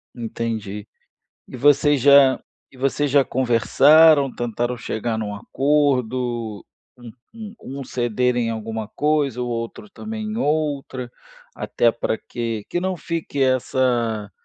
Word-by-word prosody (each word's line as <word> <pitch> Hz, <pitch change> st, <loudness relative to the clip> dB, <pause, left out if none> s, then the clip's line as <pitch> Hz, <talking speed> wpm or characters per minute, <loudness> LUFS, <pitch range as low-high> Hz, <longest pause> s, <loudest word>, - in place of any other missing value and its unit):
Entendi. 110 Hz, -3 st, -5 dB, 0.6 s
E -, -, -9 dB
vocês 145 Hz, +1 st, +3 dB
já 140 Hz, -1 st, +6 dB, 0.3 s
e 130 Hz, -, -18 dB
vocês 140 Hz, +2 st, 0 dB
já 140 Hz, -1 st, +4 dB
conversaram, 140 Hz, +4 st, +4 dB
tentaram 120 Hz, +1 st, -3 dB
chegar 110 Hz, 0 st, -3 dB
num 105 Hz, -2 st, -4 dB
acordo, 125 Hz, -4 st, -1 dB, 0.3 s
um 120 Hz, -2 st, -11 dB, 0.2 s
um 220 Hz, -1 st, -9 dB, 0.2 s
um -, -, -5 dB
cederem 120 Hz, -1 st, 0 dB
alguma 110 Hz, -1 st, -4 dB
coisa, 145 Hz, -2 st, 0 dB
o 125 Hz, -, -2 dB
outro 115 Hz, -, -5 dB
também 215 Hz, +2 st, -7 dB
em 215 Hz, +1 st, -4 dB
outra? 145 Hz, -, -2 dB, 0.4 s
Até 120 Hz, -1 st, +1 dB
pra 115 Hz, -1 st, -2 dB
que 115 Hz, -3 st, -5 dB
que 175 Hz, -, -1 dB
não 185 Hz, +1 st, -2 dB
fique 165 Hz, -4 st, -4 dB
essa 120 Hz, -4 st, 0 dB
125 Hz, 125 wpm, -21 LUFS, 115-145 Hz, 0.6 s, já